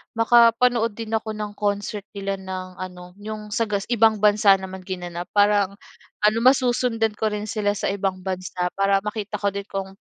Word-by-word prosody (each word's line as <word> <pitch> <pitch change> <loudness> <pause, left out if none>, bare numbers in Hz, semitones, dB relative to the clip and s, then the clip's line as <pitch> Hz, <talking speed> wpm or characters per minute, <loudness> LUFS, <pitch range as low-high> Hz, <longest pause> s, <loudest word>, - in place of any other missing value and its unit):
makapanood 230 0 +4
din 225 -1 -6
ako 220 -1 -2
ng 210 -1 -4
concert 205 0 -2
nila 195 -1 -3
ng 185 -1 -7
ano, 180 -1 -8
'yong 210 0 -7
sa 230 +1 0
gas 200 -2 -1
ibang 225 -2 +4
bansa 205 -1 +6
naman 190 0 -7
ginanap, 175 -2 -6
parang 205 -1 +3 0.5
ano 215 +2 +4
masusundan 245 -3 +2
ko 220 - +1
rin 210 -1 -3
sila 210 -1 -1
sa 195 - -1
ibang 190 -2 -2
bansa. 185 -1 -3
Para 195 0 +3
makita 210 0 -4
ko 200 0 0
din 200 0 -6
kung 195 -1 -5
205 Hz, 175 wpm, -23 LUFS, 190-220 Hz, 0.5 s, bansa